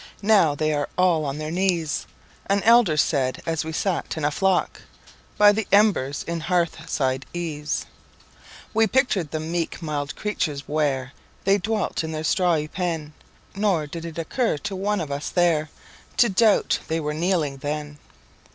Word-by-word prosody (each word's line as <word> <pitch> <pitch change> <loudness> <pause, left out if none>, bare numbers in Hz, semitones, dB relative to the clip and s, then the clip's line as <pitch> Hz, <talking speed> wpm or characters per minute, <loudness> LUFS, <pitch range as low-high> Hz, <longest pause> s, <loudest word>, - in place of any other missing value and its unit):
"Now 200 -8 +4
they 155 +1 0
are 145 -1 -1
all 175 -4 +3
on 140 0 -3
their 155 0 -4
knees,"An 185 +2 -2
elder 230 -9 +5
said 135 -3 +1
as 165 -1 -1
we 160 - -5
sat 175 0 -2
in 155 - -1
a 150 - +2
flock 190 +3 0 0.6
By 205 0 +7
the 215 0 -2
embers 200 -10 +3
in 170 0 -3
hearthside 155 -6 -1
ease. 155 -4 -3 0.9
We 225 0 +4
pictured 215 - +1
the 155 - -3
meek 165 +1 -3
mild 145 -3 -3
creatures 155 -9 -3
where 140 -3 -1 0.3
They 195 +1 +3
dwelt 210 -3 -1
in 160 0 -4
their 155 0 -3
strawy 165 -3 +2
pen, 165 -3 -3 0.4
Nor 195 -6 +1
did 165 +3 -7
it 165 -1 -7
occur 195 - 0
to 200 +5 -5
one 200 +1 -1
of 150 -3 -5
us 140 +1 -3
there 165 -4 +2 0.5
To 240 - +5
doubt 210 +2 +3
they 160 +1 -1
were 150 -1 -2
kneeling 160 -4 0
then. 145 +1 -5
165 Hz, 160 wpm, -24 LUFS, 150-190 Hz, 0.9 s, By